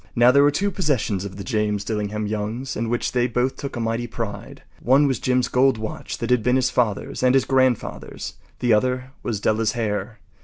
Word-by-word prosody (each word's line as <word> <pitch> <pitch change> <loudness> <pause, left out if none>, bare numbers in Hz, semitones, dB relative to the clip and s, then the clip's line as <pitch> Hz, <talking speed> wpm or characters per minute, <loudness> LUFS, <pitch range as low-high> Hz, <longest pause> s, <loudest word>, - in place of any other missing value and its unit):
Now, 120 +1 +6
there 140 +2 +5
were 145 - +6
two 200 +8 0
possessions 130 - -1
of 95 -1 -7
the 100 - -6
James 105 -3 -1
Dillingham 105 0 -2
Youngs 110 +5 -3
in 115 0 -2
which 120 0 -1
they 125 -1 +1
both 125 +2 0
took 140 -1 -6
a - - -4
mighty 115 +1 -1
pride. 110 -4 -6 0.2
One 135 +5 +4
was 130 -5 0
Jim’s 125 -1 +1
gold 130 -1 +3
watch 110 0 -5
that 115 +1 -3
had 125 -2 +4
been 125 +3 +2
his 130 -1 +2
father’s 115 -5 -1
and 130 0 +4
his 135 - +3
grandfather’s. 130 -3 0 0.3
The 120 -2 +3
other 125 +4 0
was 110 -4 -2
Della’s 110 +1 +1
hair. 110 -1 -2
120 Hz, 205 wpm, -23 LUFS, 110-130 Hz, 0.3 s, Now